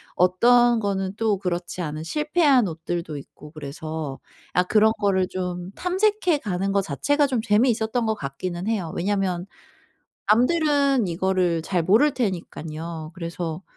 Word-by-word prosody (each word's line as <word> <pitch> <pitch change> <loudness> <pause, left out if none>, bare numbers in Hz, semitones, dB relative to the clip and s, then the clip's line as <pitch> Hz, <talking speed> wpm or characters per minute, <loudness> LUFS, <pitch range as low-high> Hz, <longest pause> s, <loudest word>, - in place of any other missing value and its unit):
어떤 235 +6 +4
거는 195 -2 -2
또 220 -3 +1
그렇지 180 -1 -3
않은 155 -1 -4
실패한 295 - +2
옷들도 165 -1 -4
있고 150 +1 -12
그래서 155 -1 -6 0.3
아 180 - +3
그런 220 +4 +4
거를 190 -3 +2
좀 180 0 -4
탐색해 370 -3 +1
가는 195 -4 -2
거 200 - +3
자체가 285 - +1
좀 255 -3 -1
재미있었던 225 +1 +1
것 220 - 0
같기는 175 +4 -5
해요. 195 -8 -2
왜냐하면 185 -2 -1 0.9
남들은 280 - +3
이거를 175 -1 0
잘 175 -1 0
모를 240 - +4
테니깐요. 165 -6 -4
그래서 170 0 -5
190 Hz, 295 characters per minute, -24 LUFS, 170-235 Hz, 0.9 s, 어떤